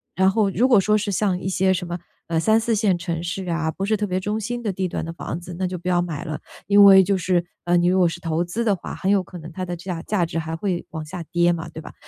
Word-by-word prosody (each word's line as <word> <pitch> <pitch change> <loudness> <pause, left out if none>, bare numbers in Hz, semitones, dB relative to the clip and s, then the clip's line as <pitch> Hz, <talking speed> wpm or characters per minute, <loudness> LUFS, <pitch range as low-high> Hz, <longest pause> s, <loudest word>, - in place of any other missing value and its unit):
然 190 0 +4
后 200 0 +2
如 235 +8 +3
果 240 -6 +6
说 210 +2 +3
是 205 -1 -2
像 190 -2 +1
一 185 - -5
些 190 0 +2
什 180 -1 -3
么， 175 0 -3 0.3
呃， 165 - -1
3-4 225 +4 +2
线 200 -4 +2
城 170 -1 -3
市 180 +1 -4
啊， 165 -1 0
不 195 - -4
是 215 +1 +2
特 210 - -1
别 185 -2 -1
中 210 +3 -2
心 240 +3 -4
的 215 -4 -1
地 190 0 -2
段 - - -4
的 165 - -5
房 170 0 -5
子， 175 0 -9
那 190 - -1
就 180 0 -4
不 175 - -8
要 175 -1 +3
买 165 -4 -4
了。 155 -1 -4 0.3
因 205 0 +7
为 195 -1 +9
就 195 +1 +1
是， 180 -1 +1 0.2
嗯， 175 0 +3
你 175 - +2
如 185 - +3
果 180 -2 +5
是 170 +1 -4
投 165 0 -1
资 190 +7 -3
的 210 -4 +2
话， 180 - -8
很 190 - -2
有 200 -2 +3
可 180 - -10
能 160 +1 -9
它 185 +1 -4
的 175 - -4
价 175 -1 -5
价 195 -5 0
值 165 - -5
还 160 0 -3
会 180 0 -2
往 160 -1 -5
下 170 +2 -6
跌 175 0 +3
嘛， 165 0 -5
对 160 0 -8
吧？ - - -11
180 Hz, 320 characters per minute, -22 LUFS, 170-200 Hz, 0.3 s, 为